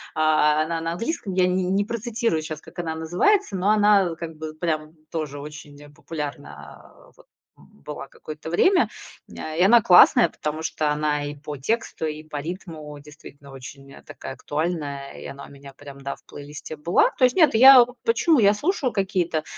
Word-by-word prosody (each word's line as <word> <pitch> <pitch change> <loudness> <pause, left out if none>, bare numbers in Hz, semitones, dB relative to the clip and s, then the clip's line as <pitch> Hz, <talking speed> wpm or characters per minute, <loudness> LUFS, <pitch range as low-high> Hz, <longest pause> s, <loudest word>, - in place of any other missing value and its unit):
А, 155 -1 +3
она 165 +1 -3
на 165 0 -3
английском, 215 - -4
я 180 0 +3
не 185 +1 0
не 195 +2 0
процитирую 230 -5 -2
щас, 155 -1 -7
как - - -17
она 160 -2 -3
называется. 180 - +1
Но 190 +2 0
она 205 -5 +3
как 165 -1 -8
бы 155 0 -7
прям 155 -1 -3 0.2
тоже 150 -3 -4
очень, 145 0 -11
э, 145 - -14
популярна, 145 -1 -8 0.2
а, - - -21
вот - - -20 0.3
была 70 - -10
какое-то 155 +1 -10
время. 360 - +3 0.4
М, - - -13
а, 155 - -6
и 170 - 0
она 225 +5 +6
классная, 175 -3 +6
потому 155 +1 -5
что 155 -2 -1
она 150 -1 -1
и 145 0 -6
по 145 0 -8
тексту, 160 - -2
и 155 0 -5
по 155 -1 -8
ритму 155 -2 -7
действительно 145 -1 -15
очень, 135 +1 -11
э, - - -14
такая - - -9
актуальная, 145 -3 -4
и - - -10
она 140 0 -9
у - - -15
меня 140 0 -13
прям, 140 0 -12
да, 140 0 -5
в - - -27
плейлисте 145 +2 -9
была. 170 +4 +2
То 255 - +5
есть 250 - +1
нет, 315 -9 +4
я 260 +2 +9
у 250 +1 -10
почему? 255 +7 +3
Я 205 -2 +5
слушаю 290 - -1
какие-то, 185 -6 -1
160 Hz, 195 wpm, -23 LUFS, 150-195 Hz, 0.4 s, я